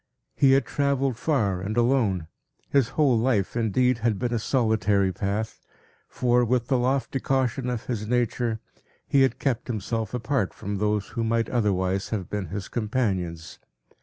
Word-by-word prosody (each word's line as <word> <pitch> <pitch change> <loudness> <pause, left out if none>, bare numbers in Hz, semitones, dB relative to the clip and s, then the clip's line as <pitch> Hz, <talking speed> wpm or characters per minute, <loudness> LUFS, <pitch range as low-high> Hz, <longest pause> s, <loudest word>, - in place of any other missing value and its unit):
He 135 -2 +5
had 135 - +3
travelled 140 -2 0
far 110 - 0
and 105 +4 -3
alone; 115 -8 +2 0.5
his 140 -4 +4
whole 135 -7 +4
life, 115 -5 +1
indeed, 120 +2 +2
had 115 -3 +1
been 120 +3 -2
a 115 - +1
solitary 105 -5 +2
path; 105 +3 -3 0.5
for, 125 0 +2
with 120 0 0
the 130 - +3
lofty 135 +2 0
caution 130 -1 0
of 120 -2 -3
his 110 -4 -3
nature, 120 -1 0 0.5
he 140 - +3
had 130 -2 +3
kept 130 -3 -1
himself 110 0 -3
apart 125 -3 -1
from 100 +1 -4
those 105 -1 0
who 115 - -3
might 115 0 0
otherwise 95 -5 0
have 100 -5 -4
been 105 -3 -2
his 100 +3 -5
companions. 95 -8 -2
115 Hz, 160 wpm, -25 LUFS, 105-125 Hz, 0.5 s, He